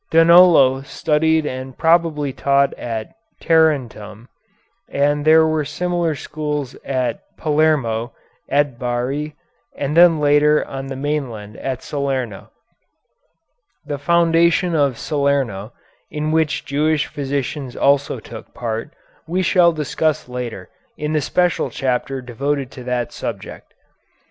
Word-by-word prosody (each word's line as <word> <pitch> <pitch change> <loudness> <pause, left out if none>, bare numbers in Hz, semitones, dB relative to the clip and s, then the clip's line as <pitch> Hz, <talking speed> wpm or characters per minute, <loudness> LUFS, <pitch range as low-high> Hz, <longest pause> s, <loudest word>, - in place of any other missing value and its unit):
Donolo 165 -5 +6
studied 160 +3 +1
and 130 -1 -6
probably 160 -4 +2
taught 140 +1 +2
at 110 -2 -5 0.3
Tarentum, 125 - 0 0.6
and 145 +1 +1
there 160 +1 +6
were 155 -1 0
similar 170 +2 -1
schools 150 -2 -4
at 130 -2 -2 0.2
Palermo, 145 -7 +1 0.4
at 140 -4 +1
Bari, 130 +5 -3 0.4
and 145 +2 -2
then 170 -2 +6
later 150 +1 +3
on 135 0 -6
the 135 - -5
mainland 130 -7 -4
at 130 -2 -4
Salerno. 135 -7 -3 1.4
The 145 -1 -4
foundation 170 +2 +3
of 140 -6 +1
Salerno, 135 -8 -1 0.4
in 150 +1 -3
which 160 -1 0
Jewish 150 +2 +1
physicians 140 -1 -4
also 140 -2 +1
took 110 0 -12
part, 115 +5 -4 0.3
we 180 +3 0
shall 175 -1 +4
discuss 155 -1 -1
later 125 -6 -6 0.3
in 150 +1 -3
the 155 - +1
special 180 +5 0
chapter 130 0 -2
devoted 135 +2 -3
to 125 - -10
that 125 -1 -2
subject. - - -7
145 Hz, 115 wpm, -19 LUFS, 130-155 Hz, 1.4 s, Donolo